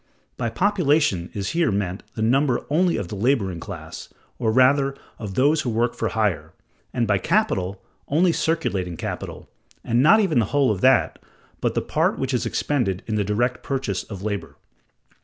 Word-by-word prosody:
By 120 -2 -2
population 150 - +1
is 100 -1 -2
here 170 -7 +1
meant 95 -1 -2
the 110 - -2
number 130 +2 +2
only 175 +3 +2
of 90 - -4
the - - -5
laboring 100 -5 0
class, - - -8 0.3
or 115 -3 +1
rather 135 +3 +4 0.2
of 100 -4 -6
those 145 +4 +3
who 125 - -2
work 120 +1 0
for - - -2
hire; 90 -9 -1 0.4
and 120 - 0
by 100 -3 +2
capital, 100 - 0 0.3
only 170 +5 +3
circulating 100 - -1
capital, - - -6 0.4
and 120 +1 +2
not 200 +10 +6
even 185 - +2
the 115 - +2
whole 140 +2 +2
of 95 -3 -3
that, 130 +1 +3 0.4
but - - -1
the - - 0
part - - 0
which 135 0 -2
is 125 - 0
expended 115 -11 -1
in 110 - -4
the 105 -1 +1
direct 120 +5 0
purchase 130 -10 -2
of 100 -3 -9
labor. 95 -9 -4
120 Hz, 175 wpm, -23 LUFS, 100-145 Hz, 0.4 s, not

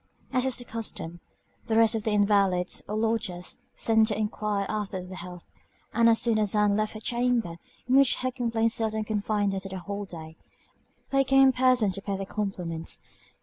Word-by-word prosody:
As 255 0 +2
is 260 - +2
the 245 - -9
custom, 200 -7 -5 0.5
the 220 -1 +1
rest 225 0 +5
of 220 -2 -3
the - - +2
invalids, 200 -3 +2
or 210 - -2
lodgers, 215 -5 -1 0.2
sent 220 -1 +3
to 210 -2 -1
enquire 210 -1 -1
after 205 -3 -3
their 185 +1 -9
health; 180 -1 -9 0.5
and 230 0 +5
as 225 - +5
soon 230 -2 +2
as 210 -1 +1
Ann 210 -1 +3
left 215 0 -1
her 215 - -7
chamber, 235 -6 0 0.3
in 255 +2 +4
which 275 -2 +5
her 255 0 -2
complaints 230 -2 0
seldom 220 -1 0
confined 210 -1 -1
her 195 - -2
the 190 0 -6
whole 200 +3 -5
day, 160 -3 -9 0.7
they 275 0 +4
came 270 0 +5
in - - +4
person 255 -5 +3
to 195 - -5
pay 200 -1 -3
their 195 - -4
compliments. 180 -6 -4
215 Hz, 190 wpm, -27 LUFS, 195-230 Hz, 0.7 s, rest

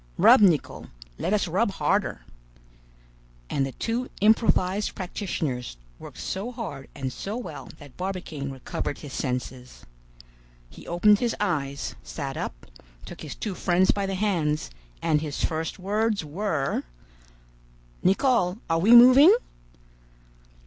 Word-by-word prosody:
Rub, - - +7
Nicholl; 175 -8 +2 0.3
let - - -1
us - - +1
rub - - 0
harder." - - 0 1.3
And 135 -1 0
the - - -6
two 240 +2 -3
improvised 210 -2 +2
practitioners 160 - -4 0.2
worked - - -11
so 200 +6 -4
hard 185 - -7
and 130 -2 -4
so 205 - -5
well 180 -11 -8
that 145 -3 -15
Barbicane 180 -7 -4
recovered 135 +1 -4
his 145 -3 -10
senses. 125 -1 -5 0.9
He - - -13
opened 205 +4 +4
his 240 -2 0
eyes, 140 -8 -2
sat 140 -3 -6
up, - - -6 0.4
took - - -10
his - - -7
two 210 - -4
friends 180 +1 +2
by 200 -1 -2
the 195 - -2
hands, 170 - 0 0.3
and 150 -1 +2
his 150 -2 -2
first 160 0 -3
words 210 0 -1
were— 155 -3 -1 1.2
"Nicholl, 195 -2 +2
are 165 - +2
we 220 +8 +6
moving?" 255 +8 +9
180 Hz, 130 wpm, -25 LUFS, 145-210 Hz, 1.3 s, moving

